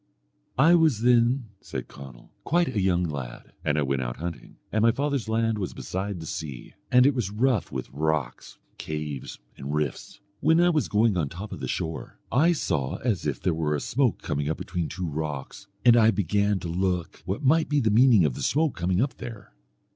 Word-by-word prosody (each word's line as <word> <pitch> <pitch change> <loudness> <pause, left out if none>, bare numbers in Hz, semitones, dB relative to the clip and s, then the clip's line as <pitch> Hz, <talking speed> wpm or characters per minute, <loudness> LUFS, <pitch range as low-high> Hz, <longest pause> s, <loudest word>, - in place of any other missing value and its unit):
"I 160 +6 +6
was 160 -10 +4
then," 120 0 +3
said - - -6
Conall, 65 -3 -12
quite 170 0 +2
a 100 - +2
young 90 -2 +2
lad, 70 -7 -6
and 75 - +1
I 75 - +2
went 70 -1 0
out - - -4
hunting, 85 +1 -7 0.2
and 110 - +1
my 115 - +5
father's 140 -2 -2
land 115 -1 +1
was 95 - -4
beside 95 0 -4
the 80 - -7
sea, 70 -5 -6 0.2
and 125 0 +6
it 140 - +5
was 120 -7 -1
rough 115 +1 0
with 65 -1 -4
rocks, 75 -3 -2 0.2
caves, 75 -3 -5 0.2
and 70 +2 -4
rifts. 75 +5 -3 0.2
When 160 +1 +4
I 175 0 +5
was 155 -3 +1
going 110 0 +2
on 80 -4 +1
the 70 - -11
top 100 +4 -7
of - - -6
the - - -4
shore, 80 -1 -4
I 155 +8 +4
saw 75 - -1
as 110 -8 0
if - - -2
there 90 - 0
were 80 -2 0
a - - -1
smoke 125 - 0
coming 75 -2 -2
up 80 - -1
between 85 -3 -3
two 90 +4 -4
rocks, 75 +3 -5 0.2
and 120 -1 +8
I 110 -2 +6
began 100 0 +1
to 85 - -4
look 90 0 -2
what 100 +10 -3
might 155 +4 +3
be 150 -1 +2
the 110 -5 +2
meaning 115 -5 +6
of 70 - +1
the - - -7
smoke 155 0 +1
coming 90 +2 0
up 135 - -3
there. 115 - -9
95 Hz, 210 wpm, -26 LUFS, 75-120 Hz, 0.2 s, and